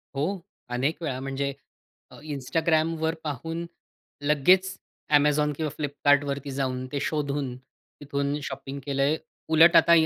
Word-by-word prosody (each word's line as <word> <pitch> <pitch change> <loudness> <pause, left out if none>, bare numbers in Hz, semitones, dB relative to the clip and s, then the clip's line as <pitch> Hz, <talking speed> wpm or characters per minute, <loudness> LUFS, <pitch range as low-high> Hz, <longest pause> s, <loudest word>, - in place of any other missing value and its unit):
हो. 180 +8 -1 0.3
अनेक 135 +7 -1
वेळा 130 -4 -2
म्हणजे 135 +1 -2 0.6
अ, - - -13 0.2
Instagramवर 160 +3 +1
पाहून 165 +4 -4 0.6
लगेच 185 +6 +4 0.4
Amazon 150 0 +3
किंवा 155 -2 -2
Flipkartवरती 145 -1 +1
जाऊन 130 -1 -2
ते 140 - -1
शोधून 140 -4 -2
तिथून 140 +2 -5
शॉपिंग 135 +1 -6
केलंय. 140 +2 +2 0.3
उलट 165 +2 +7
आता 170 - +6
145 Hz, 115 wpm, -26 LUFS, 135-160 Hz, 0.6 s, उलट